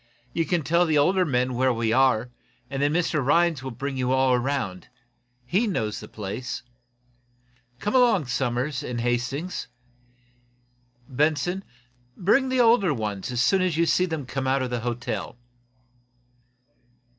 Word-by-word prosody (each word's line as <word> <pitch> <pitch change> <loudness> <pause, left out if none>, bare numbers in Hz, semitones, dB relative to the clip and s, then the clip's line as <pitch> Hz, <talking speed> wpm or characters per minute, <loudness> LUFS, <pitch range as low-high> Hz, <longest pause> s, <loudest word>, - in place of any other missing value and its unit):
You 165 - 0
can 175 -3 0
tell 170 +4 +2
the 155 -1 +2
older 180 +6 +3
men 125 -3 0
where 130 +1 +2
we 115 -1 0
are, 125 -2 +3 0.4
and 135 0 -2
then 145 +1 +2
Mr 160 -3 0
Rhinds 165 +1 +2
will 135 - -5
bring 135 +3 -5
you 130 -1 0
all 130 -1 +3
around. 125 -7 -2 0.6
He 195 - +1
knows 110 - -2
the 105 - -10
place. 105 +4 -5 1.1
Come 205 - -3
along, 240 - +4
Somers 125 +2 -1
and 125 -4 -4
Hastings. 120 +8 -2 1.4
Benson, 150 +7 0 0.5
bring 260 +9 +3
the 260 0 +1
older 225 - +4
ones 105 -3 -4
as 125 -1 0
soon 190 +8 +3
as 180 -4 0
you 170 - +3
see 180 +3 +2
them 160 -5 -4
come 130 +1 -3
out 135 0 +2
of 125 - -4
the 120 - -1
hotel." 120 0 -4
135 Hz, 150 wpm, -25 LUFS, 125-170 Hz, 1.4 s, along